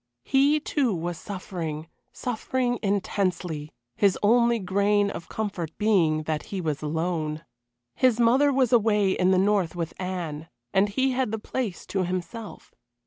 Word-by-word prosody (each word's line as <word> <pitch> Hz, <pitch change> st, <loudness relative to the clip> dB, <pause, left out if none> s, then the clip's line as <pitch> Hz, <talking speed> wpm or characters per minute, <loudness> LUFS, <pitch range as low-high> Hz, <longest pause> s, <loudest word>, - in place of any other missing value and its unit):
He, 280 Hz, +3 st, +3 dB
too, 275 Hz, -7 st, 0 dB
was 170 Hz, 0 st, -4 dB
suffering, 165 Hz, -5 st, -5 dB, 0.2 s
suffering 245 Hz, 0 st, -2 dB
intensely, 185 Hz, -6 st, -1 dB, 0.2 s
his 200 Hz, -2 st, +3 dB
only 235 Hz, +2 st, +4 dB
grain 200 Hz, +1 st, +1 dB
of 170 Hz, -, -8 dB
comfort 190 Hz, -7 st, -4 dB
being 170 Hz, -8 st, +2 dB
that 155 Hz, -1 st, -2 dB
he 195 Hz, -, -3 dB
was 155 Hz, -4 st, -2 dB
alone. 160 Hz, 0 st, -2 dB, 0.5 s
His 245 Hz, -, +2 dB
mother 260 Hz, +5 st, +4 dB
was 260 Hz, -3 st, +2 dB
away 210 Hz, -4 st, +4 dB
in 185 Hz, 0 st, +2 dB
the 190 Hz, -, +4 dB
north 190 Hz, -3 st, +2 dB
with 165 Hz, -2 st, -3 dB
Anne, 170 Hz, -4 st, -4 dB, 0.2 s
and 195 Hz, +2 st, +3 dB
he 260 Hz, +6 st, +1 dB
had 255 Hz, -2 st, 0 dB
the 220 Hz, -, -1 dB
place 220 Hz, -2 st, -4 dB
to 190 Hz, -2 st, -1 dB
himself. 185 Hz, +5 st, -5 dB
195 Hz, 145 wpm, -26 LUFS, 170-230 Hz, 0.5 s, only